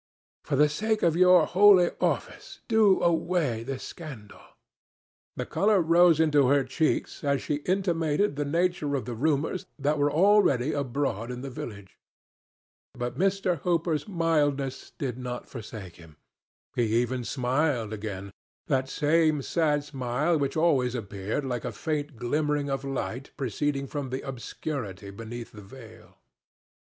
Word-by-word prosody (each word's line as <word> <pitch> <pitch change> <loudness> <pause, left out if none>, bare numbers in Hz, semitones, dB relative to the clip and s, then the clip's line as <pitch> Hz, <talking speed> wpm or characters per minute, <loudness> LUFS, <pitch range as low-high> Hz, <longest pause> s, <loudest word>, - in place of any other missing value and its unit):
For - - -1
the 150 +2 +5
sake 215 +8 -1
of 165 -2 +3
your 180 -1 +6
holy 190 -1 +6
office - - -2
do 220 -4 +4
away 165 -8 +1
this 130 +2 -5
scandal." 135 -11 -10 0.9
The - - -3
color 205 0 +2
rose 170 -1 +5
into 150 -4 +4
her 140 +1 +4
cheeks 145 +6 -1
as 140 -1 +1
she 145 - -2
intimated 175 -2 +1
the 145 - -1
nature 165 -1 0
of 130 - -3
the 120 - -4
rumors 150 +7 -1
that 145 +1 0
were 145 0 +2
already 160 - +4
abroad 135 -5 -2
in 125 0 -5
the 135 0 -6
village. 100 -6 -9 1.0
But 120 0 -4
Mr. 190 -3 +1
Hooper's 165 -1 0
mildness 145 -7 0
did 130 -3 -3
not 125 -1 -5
forsake 105 -6 -9
him. 80 -4 -16 0.6
He 115 -1 +2
even 125 +1 -1
smiled 125 -2 0
again—that 105 - -5
same 155 -1 +2
sad 150 -3 +1
smile 140 +3 -1
which 145 0 -1
always 135 -7 +2
appeared 105 +3 -4
like 125 -3 -3
a 125 - -3
faint 150 +4 -3
glimmering 145 +4 -1
of 135 0 -2
light 135 -1 -4
proceeding 140 +3 -1
from 140 -1 -5
the 130 +1 -3
obscurity 115 -6 -5
beneath 115 +3 -8
the 105 - -11
veil. 110 +2 -14
140 Hz, 140 wpm, -27 LUFS, 125-160 Hz, 1.0 s, your